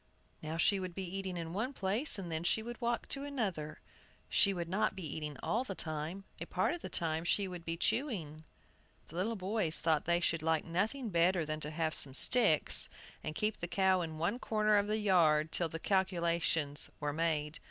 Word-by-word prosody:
Now 155 Hz, +1 st, -5 dB
she 195 Hz, +4 st, +3 dB
would 185 Hz, -2 st, -6 dB
be 195 Hz, -, -4 dB
eating 190 Hz, 0 st, -5 dB
in 165 Hz, -1 st, -6 dB
one 230 Hz, +8 st, -3 dB
place, 210 Hz, +6 st, +2 dB
and 180 Hz, -4 st, -7 dB
then 160 Hz, +1 st, -3 dB
she 220 Hz, +5 st, +1 dB
would 240 Hz, +2 st, -8 dB
walk 235 Hz, 0 st, -2 dB
to 275 Hz, -, -3 dB
another. 200 Hz, -, -4 dB, 0.5 s
She 200 Hz, -, +4 dB
would 175 Hz, -3 st, -4 dB
not 195 Hz, +4 st, -1 dB
be 190 Hz, -3 st, -7 dB
eating 150 Hz, -2 st, -6 dB
all 235 Hz, +4 st, -1 dB
the 200 Hz, -7 st, -7 dB
time, 160 Hz, +4 st, -5 dB, 0.2 s
a -, -, -7 dB
part -, -, -1 dB
of 345 Hz, -, -7 dB
the -, -, -7 dB
time 160 Hz, -1 st, -2 dB
she 195 Hz, +3 st, 0 dB
would 180 Hz, -2 st, -8 dB
be 165 Hz, 0 st, -4 dB
chewing." 195 Hz, -, -2 dB, 0.7 s
The 160 Hz, -, -13 dB
little 210 Hz, +6 st, -2 dB
boys 190 Hz, -4 st, 0 dB
thought 160 Hz, -2 st, 0 dB
they 170 Hz, 0 st, +1 dB
should 165 Hz, -2 st, 0 dB
like 160 Hz, 0 st, 0 dB
nothing 215 Hz, +9 st, -2 dB
better 170 Hz, 0 st, +2 dB
than 155 Hz, 0 st, -4 dB
to 150 Hz, -, -2 dB
have 160 Hz, 0 st, -2 dB
some 135 Hz, -3 st, +4 dB
sticks, 210 Hz, -, +8 dB, 0.3 s
and 155 Hz, -, -5 dB
keep 215 Hz, -1 st, -2 dB
the 175 Hz, -, -4 dB
cow 190 Hz, 0 st, +1 dB
in 160 Hz, -2 st, -6 dB
one 175 Hz, +9 st, -2 dB
corner 215 Hz, -3 st, +1 dB
of 205 Hz, 0 st, 0 dB
the 215 Hz, +1 st, -1 dB
yard 160 Hz, -7 st, +2 dB
till 170 Hz, -2 st, 0 dB
the 165 Hz, -, -6 dB
calculations 170 Hz, -5 st, -1 dB
were 150 Hz, -1 st, -3 dB
made. 155 Hz, -1 st, -2 dB
175 Hz, 205 wpm, -32 LUFS, 160-205 Hz, 0.7 s, sticks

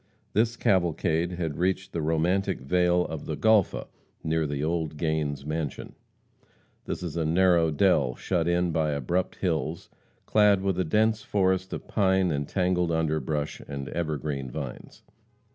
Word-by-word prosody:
This 115 Hz, +2 st, +2 dB
cavalcade 85 Hz, -2 st, +1 dB
had 80 Hz, -4 st, -3 dB
reached 95 Hz, +1 st, -1 dB
the 85 Hz, -, -1 dB
romantic 80 Hz, +3 st, +1 dB
vale 90 Hz, +5 st, +2 dB
of 80 Hz, -2 st, -6 dB
the 75 Hz, -, -3 dB
Golpha, 110 Hz, -4 st, +3 dB, 0.4 s
near 80 Hz, -1 st, 0 dB
the 70 Hz, 0 st, -3 dB
old 80 Hz, -1 st, -2 dB
Gains' 75 Hz, -3 st, -1 dB
mansion. 75 Hz, -3 st, -4 dB, 0.9 s
This -, -, -4 dB
is 85 Hz, -3 st, -5 dB
a 85 Hz, -, 0 dB
narrow 85 Hz, 0 st, +3 dB
dell, 75 Hz, -6 st, +2 dB
shut 85 Hz, -3 st, -1 dB
in 85 Hz, 0 st, +1 dB
by 80 Hz, -2 st, 0 dB
abrupt 85 Hz, +7 st, -1 dB
hills, 80 Hz, -2 st, -2 dB, 0.3 s
clad 105 Hz, -2 st, +4 dB
with 95 Hz, -2 st, 0 dB
a -, -, +3 dB
dense 110 Hz, +6 st, +2 dB
forest 95 Hz, -2 st, 0 dB
of -, -, -6 dB
pine 95 Hz, -3 st, +2 dB
and 70 Hz, -1 st, -2 dB
tangled 90 Hz, -2 st, +1 dB
underbrush 80 Hz, -2 st, -1 dB
and 70 Hz, -2 st, -5 dB
evergreen 75 Hz, -5 st, -3 dB
vines. -, -, -8 dB
85 Hz, 145 wpm, -27 LUFS, 75-95 Hz, 0.9 s, clad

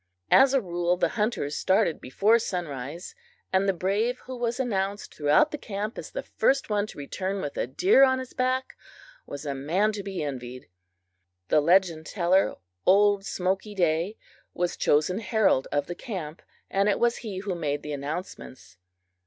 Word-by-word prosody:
As 270 Hz, 0 st, +6 dB
a 270 Hz, -, +3 dB
rule, 175 Hz, -2 st, 0 dB
the -, -, +1 dB
hunters 210 Hz, -10 st, -1 dB
started 190 Hz, -4 st, +1 dB
before 210 Hz, -, +3 dB
sunrise, 165 Hz, -, -5 dB, 0.4 s
and 190 Hz, +1 st, +3 dB
the -, -, +6 dB
brave 200 Hz, +7 st, 0 dB
who 255 Hz, -, -8 dB
was 240 Hz, 0 st, -2 dB
announced 200 Hz, -5 st, -2 dB
throughout 150 Hz, -, +3 dB
the 300 Hz, -, -5 dB
camp 210 Hz, 0 st, -4 dB
as -, -, -8 dB
the -, -, -5 dB
first 270 Hz, -4 st, +1 dB
one 205 Hz, 0 st, +1 dB
to -, -, -12 dB
return 190 Hz, +7 st, -3 dB
with 145 Hz, -5 st, -4 dB
a -, -, -1 dB
deer 275 Hz, -, +4 dB
on 260 Hz, -1 st, +4 dB
his 260 Hz, -1 st, -7 dB
back, 255 Hz, +1 st, -1 dB, 0.5 s
was 145 Hz, +2 st, -7 dB
a 140 Hz, -, -2 dB
man 170 Hz, +11 st, +1 dB
to 210 Hz, -1 st, -5 dB
be 195 Hz, -4 st, -4 dB
envied. 125 Hz, -3 st, -6 dB, 0.8 s
The 150 Hz, -, +4 dB
legend 170 Hz, -1 st, +3 dB
teller, 185 Hz, 0 st, +2 dB, 0.3 s
old 200 Hz, +1 st, +4 dB
Smoky 195 Hz, +3 st, -2 dB
Day, 175 Hz, +3 st, +1 dB, 0.4 s
was 175 Hz, 0 st, -1 dB
chosen 155 Hz, +7 st, +2 dB
herald 210 Hz, -, +2 dB
of 145 Hz, -1 st, 0 dB
the 175 Hz, -, -5 dB
camp, 175 Hz, -, -6 dB, 0.3 s
and 195 Hz, +2 st, +1 dB
it 200 Hz, -, +2 dB
was 235 Hz, 0 st, +2 dB
he 210 Hz, -5 st, -6 dB
who 195 Hz, 0 st, -3 dB
made 145 Hz, -4 st, -2 dB
the 150 Hz, -, -5 dB
announcements. 140 Hz, -, -7 dB
190 Hz, 170 wpm, -26 LUFS, 155-215 Hz, 0.8 s, As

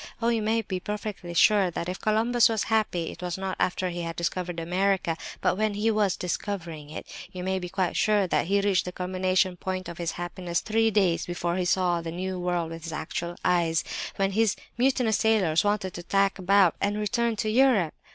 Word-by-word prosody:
Oh, 230 Hz, 0 st, +1 dB
you 230 Hz, -2 st, +1 dB
may 225 Hz, +1 st, +1 dB
be 190 Hz, -2 st, -3 dB
perfectly 205 Hz, -3 st, -5 dB
sure 200 Hz, +1 st, +5 dB
that 170 Hz, 0 st, -4 dB
if 180 Hz, +1 st, -5 dB
Columbus 225 Hz, +2 st, +3 dB
was 220 Hz, -2 st, 0 dB
happy, 180 Hz, -6 st, 0 dB
it -, -, -12 dB
was 180 Hz, -1 st, -3 dB
not 190 Hz, 0 st, -3 dB
after 185 Hz, 0 st, 0 dB
he 175 Hz, 0 st, -4 dB
had 165 Hz, 0 st, -4 dB
discovered 175 Hz, 0 st, -2 dB
America, 180 Hz, 0 st, 0 dB, 0.3 s
but 185 Hz, -, +1 dB
when 215 Hz, -1 st, +1 dB
he 215 Hz, +2 st, +1 dB
was 210 Hz, -3 st, +1 dB
discovering 170 Hz, -5 st, -4 dB
it! 155 Hz, -, -7 dB, 0.3 s
You 180 Hz, -1 st, -6 dB
may 190 Hz, 0 st, 0 dB
be 180 Hz, -1 st, -6 dB
quite 185 Hz, -1 st, -1 dB
sure 210 Hz, -2 st, +3 dB
that 175 Hz, -, 0 dB
he 200 Hz, +2 st, +3 dB
reached 200 Hz, -2 st, +2 dB
the 180 Hz, -, -4 dB
culminating 185 Hz, 0 st, 0 dB
point 185 Hz, 0 st, -4 dB
of 170 Hz, -1 st, -8 dB
his 170 Hz, -1 st, -2 dB
happiness 175 Hz, 0 st, -3 dB
three 225 Hz, +1 st, +2 dB
days 190 Hz, -5 st, +1 dB
before 175 Hz, 0 st, -2 dB
he 180 Hz, -1 st, 0 dB
saw 175 Hz, -1 st, +2 dB
the 165 Hz, 0 st, -5 dB
New 185 Hz, +2 st, -4 dB
World 175 Hz, -2 st, -1 dB
with 165 Hz, 0 st, -7 dB
his 165 Hz, -, -5 dB
actual 170 Hz, +1 st, -4 dB
eyes, 165 Hz, -2 st, +2 dB, 0.3 s
when 195 Hz, 0 st, +1 dB
his 215 Hz, 0 st, +2 dB, 0.2 s
mutinous 250 Hz, -3 st, +2 dB
sailors 195 Hz, -8 st, +3 dB
wanted 205 Hz, -3 st, 0 dB
to 175 Hz, -, -6 dB
tack 195 Hz, +2 st, +1 dB
about, 190 Hz, -2 st, +4 dB
and 205 Hz, +1 st, 0 dB
return 235 Hz, +2 st, 0 dB
to 215 Hz, 0 st, -1 dB
Europe! 230 Hz, -, +3 dB
185 Hz, 210 wpm, -27 LUFS, 175-210 Hz, 0.3 s, sure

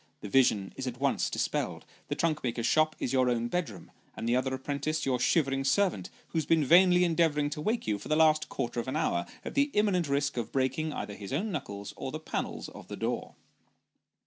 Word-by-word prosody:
The 105 Hz, -, -6 dB
vision 105 Hz, -6 st, +3 dB
is 135 Hz, -, -4 dB
at 125 Hz, -1 st, -5 dB
once 140 Hz, 0 st, +1 dB
dis -, -, 0 dB
pelled; -, -, -3 dB, 0.2 s
the -, -, -2 dB
trunk 155 Hz, -2 st, 0 dB
maker's 120 Hz, -2 st, -1 dB
shop 155 Hz, +4 st, +3 dB
is 125 Hz, -, -2 dB
your 130 Hz, -1 st, +3 dB
own 120 Hz, -1 st, 0 dB
bedroom, 130 Hz, -, -4 dB, 0.3 s
and 115 Hz, -, -3 dB
the 120 Hz, -, +3 dB
other 130 Hz, +1 st, 0 dB
apprentice 145 Hz, +3 st, -2 dB
your 130 Hz, -2 st, +1 dB
shivering 135 Hz, -1 st, +2 dB
servant, 135 Hz, -, +1 dB, 0.2 s
who 165 Hz, -, 0 dB
has 155 Hz, -, -2 dB
been 160 Hz, -3 st, +3 dB
vainly 180 Hz, +3 st, +6 dB
endeavouring 160 Hz, -4 st, +2 dB
to 150 Hz, 0 st, -4 dB
wake 220 Hz, +8 st, -1 dB
you 105 Hz, -2 st, -1 dB
for -, -, -9 dB
the 155 Hz, -, +2 dB
last 155 Hz, -1 st, +4 dB
quarter 120 Hz, 0 st, -3 dB
of 120 Hz, -, -4 dB
an 130 Hz, -, -2 dB
hour, 85 Hz, -, 0 dB, 0.2 s
at -, -, -5 dB
the 285 Hz, +1 st, +2 dB
imminent 195 Hz, -7 st, +2 dB
risk 140 Hz, -1 st, 0 dB
of 115 Hz, -2 st, -3 dB
breaking 135 Hz, +4 st, 0 dB
either 105 Hz, -, -5 dB
his 100 Hz, -1 st, -8 dB
own 190 Hz, +10 st, -1 dB
knuckles 100 Hz, -, -5 dB
or 130 Hz, -, -4 dB
the 155 Hz, -, -5 dB
panels 155 Hz, -, -4 dB
of -, -, -12 dB
the -, -, -7 dB
door. -, -, -3 dB
140 Hz, 225 wpm, -29 LUFS, 125-160 Hz, 0.3 s, vainly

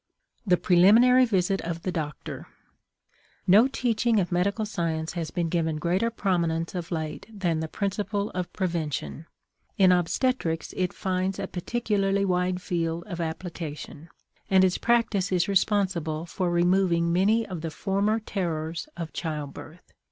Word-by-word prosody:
THE 180 Hz, -1 st, +4 dB
PRELIMINARY 225 Hz, +10 st, +6 dB
VISIT 195 Hz, -3 st, +1 dB
OF 170 Hz, 0 st, -5 dB
THE 185 Hz, -, -1 dB
DOCTOR. 150 Hz, -4 st, -5 dB, 1.0 s
No 210 Hz, +7 st, +6 dB
teaching 235 Hz, -4 st, +1 dB
of 180 Hz, -2 st, -1 dB
medical 200 Hz, +5 st, +1 dB
science 165 Hz, -5 st, -2 dB
has 165 Hz, -3 st, -3 dB
been 175 Hz, -2 st, -1 dB
given 160 Hz, -1 st, 0 dB
greater 180 Hz, +8 st, +1 dB
prominence 170 Hz, -6 st, -1 dB
of 175 Hz, -2 st, -5 dB
late 160 Hz, -2 st, -4 dB
than 175 Hz, -6 st, -1 dB
the 160 Hz, -, -3 dB
principle 205 Hz, +2 st, -2 dB
of 180 Hz, -1 st, -4 dB
prevention. 165 Hz, -3 st, -3 dB, 0.5 s
In 190 Hz, -2 st, +6 dB
obstetrics 175 Hz, 0 st, 0 dB
it 180 Hz, -1 st, 0 dB
finds 185 Hz, 0 st, -2 dB
a -, -, -3 dB
particularly 200 Hz, 0 st, 0 dB
wide 180 Hz, 0 st, 0 dB
field 165 Hz, -1 st, -2 dB
of 175 Hz, -4 st, -5 dB
application, 160 Hz, -2 st, -6 dB, 0.4 s
and 190 Hz, -1 st, +5 dB
its 185 Hz, -1 st, +2 dB
practice 225 Hz, -5 st, +1 dB
is 180 Hz, -2 st, +2 dB
responsible 185 Hz, -5 st, +1 dB
for 180 Hz, +1 st, -2 dB
removing 175 Hz, -1 st, +2 dB
many 210 Hz, +6 st, +3 dB
of 180 Hz, -6 st, -6 dB
the 165 Hz, -, -3 dB
former 200 Hz, +6 st, 0 dB
terrors 170 Hz, -, -3 dB
of 165 Hz, -2 st, -5 dB
childbirth. 155 Hz, +1 st, -6 dB
180 Hz, 140 wpm, -26 LUFS, 165-200 Hz, 1.0 s, PRELIMINARY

